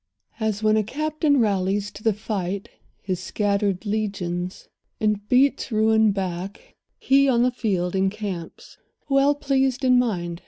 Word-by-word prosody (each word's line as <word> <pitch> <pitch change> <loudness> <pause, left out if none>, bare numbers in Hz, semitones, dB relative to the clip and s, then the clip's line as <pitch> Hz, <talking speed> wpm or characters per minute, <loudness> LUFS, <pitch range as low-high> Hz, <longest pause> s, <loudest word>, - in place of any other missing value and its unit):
As 220 -1 -1
when 215 0 +4
a 215 - +2
captain 305 - 0
rallies 200 -1 0
to 205 - -12
the 220 - +2
fight 200 -2 -4 0.3
His 185 -2 -2
scattered 200 0 -1
legions, 195 -4 -3 0.3
and 210 -1 -1
beats 265 +1 +2
ruin 220 0 +3
back, 190 +1 -5 0.2
He, 275 +1 +3
on 240 -2 +3
the 250 - +2
field, 190 -7 -1
encamps, 190 -3 -4 0.3
well 275 +1 +4
pleased 270 -2 0
in 250 -1 +5
mind. 175 -8 -2
210 Hz, 135 wpm, -23 LUFS, 195-250 Hz, 0.3 s, in